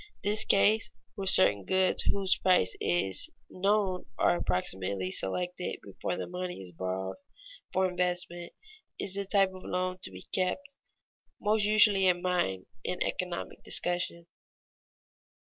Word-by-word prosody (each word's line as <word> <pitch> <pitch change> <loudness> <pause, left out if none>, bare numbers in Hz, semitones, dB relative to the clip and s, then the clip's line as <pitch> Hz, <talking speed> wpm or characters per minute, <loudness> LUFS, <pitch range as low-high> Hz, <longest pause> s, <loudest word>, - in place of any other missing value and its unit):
This 210 +2 +1
case, 215 +3 +3 0.2
where 195 -3 -5
certain 105 - +6
goods 185 - +2
whose 190 -1 +1
price 180 - +2
is 95 +2 0 0.2
known 195 -1 0
are - - +3
approximately 95 +1 -1
selected 180 - -1
before - - -4
the - - -4
money 180 0 -5
is 95 -2 -9
borrowed 95 +2 -4 0.5
for 190 0 +2
investment, 180 -1 -1 0.5
is 190 - -1
the 200 0 -2
type 195 -1 +2
of 185 - -11
loan 185 0 -2
to - - -3
be 95 -1 -10
kept 200 +10 -1 0.7
most 210 0 +2
usually 210 -2 +6
in 175 -1 +2
mind 175 - 0 0.2
in 180 - -2
economic 180 -2 -4
discussion. 175 -1 -2
180 Hz, 130 wpm, -29 LUFS, -, 0.7 s, certain